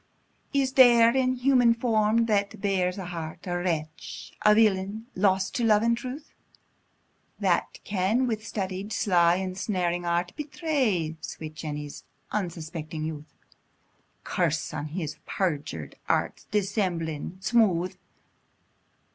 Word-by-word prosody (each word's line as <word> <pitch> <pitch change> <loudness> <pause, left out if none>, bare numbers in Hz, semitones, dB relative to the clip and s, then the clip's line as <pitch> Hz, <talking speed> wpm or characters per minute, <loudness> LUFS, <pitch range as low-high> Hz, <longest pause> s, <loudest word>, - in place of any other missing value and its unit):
Is 270 -2 +1
there, 240 -2 +7
in 255 -1 +2
human 250 -2 +4
form, 230 -1 +2
that 205 -3 0
bears 190 -2 0
a 190 - -5
heart, 165 -2 -6
A 175 -1 -2
wretch! 155 - -4
a 210 0 +6
villain! 210 0 +2
lost 190 0 +2
to 240 - 0
love 215 -1 +4
and 235 0 +3
truth! 260 +5 -7 1.1
That - - +1
can, 205 +6 +1
with 220 -3 -2
studied, 195 -1 -4
sly, 175 -5 +4
ensnaring 185 -1 -1
art, 175 +1 0
Betray 270 - -1
sweet 155 -1 -7
Jenny's 150 -2 -6 0.3
unsuspecting 165 -5 -4
youth? 155 -1 -6 0.9
Curse - - -1
on 150 - -3
his 155 -1 -4
perjur'd 150 - -2 0.2
arts! - - 0
dissembling 185 -6 -1
smooth! 190 -5 +2
190 Hz, 115 wpm, -27 LUFS, 170-225 Hz, 1.1 s, there